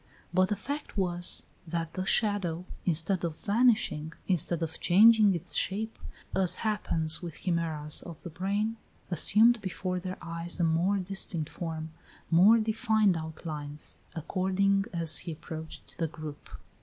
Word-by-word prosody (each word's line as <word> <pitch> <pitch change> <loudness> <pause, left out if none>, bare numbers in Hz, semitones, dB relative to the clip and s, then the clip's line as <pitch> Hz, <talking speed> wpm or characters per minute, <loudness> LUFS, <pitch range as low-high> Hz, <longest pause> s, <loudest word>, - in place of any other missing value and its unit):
But 185 +1 +3
the 210 - 0
fact 285 +5 -6
was, 175 -2 +1 0.2
that 165 0 -3
the 185 - -3
shadow, 190 -6 +1 0.2
instead 175 +3 +1
of 165 -2 -3
vanishing, 210 -8 +1
instead 175 -2 +1
of 160 0 -5
changing 210 +1 +6
its 170 - -3
shape, 220 +3 -1 0.4
as 185 -2 +3
happens 165 -7 +2
with 170 -4 -8
chimeras 160 -4 -1
of 170 -3 -11
the 175 - -7
brain, 200 +6 -2 0.3
assumed 220 +7 +5
before 185 -1 -3
their 185 +1 -6
eyes 170 +1 -3
a - - +2
more 170 +5 +2
distinct 185 -4 -2
form, 160 -2 -5 0.4
more 190 +7 +7
definite 220 -3 +2
outlines, 155 -2 -4 0.2
according 190 +4 +1
as 165 -3 +2
he 170 -2 -6
approached 160 +1 -9
the 165 - +1
group. 155 -1 -9
175 Hz, 140 wpm, -29 LUFS, 160-200 Hz, 0.4 s, more